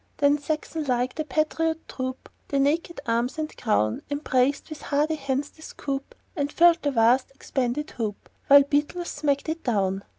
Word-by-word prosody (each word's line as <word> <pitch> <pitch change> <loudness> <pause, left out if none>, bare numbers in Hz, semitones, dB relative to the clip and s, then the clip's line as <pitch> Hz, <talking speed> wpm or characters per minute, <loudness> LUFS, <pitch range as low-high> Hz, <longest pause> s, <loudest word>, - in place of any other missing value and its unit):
Then 285 0 +3
sextonlike, 285 -4 -1
the 310 - -3
patriot 320 +1 -1
troop, 260 0 -5 0.2
With 275 -1 +2
naked 330 +4 0
arms 235 +4 0
and 310 0 -4
crown, 110 - +1
Embraced, 285 0 0
with 310 - -7
hardy 300 +2 +1
hands, 280 -1 -2
the 315 - -20
scoop, 275 -3 -5 0.2
And 285 -3 -1
filled 340 +1 +5
the 290 - +1
vast 245 0 +3
expanded 265 +2 -2
hoop, 215 -4 -4 0.2
While 280 0 +9
beetles 295 +5 -1
smacked 290 -1 -1
it 325 +1 -3
down. 195 -5 0
285 Hz, 160 wpm, -25 LUFS, 255-310 Hz, 0.2 s, While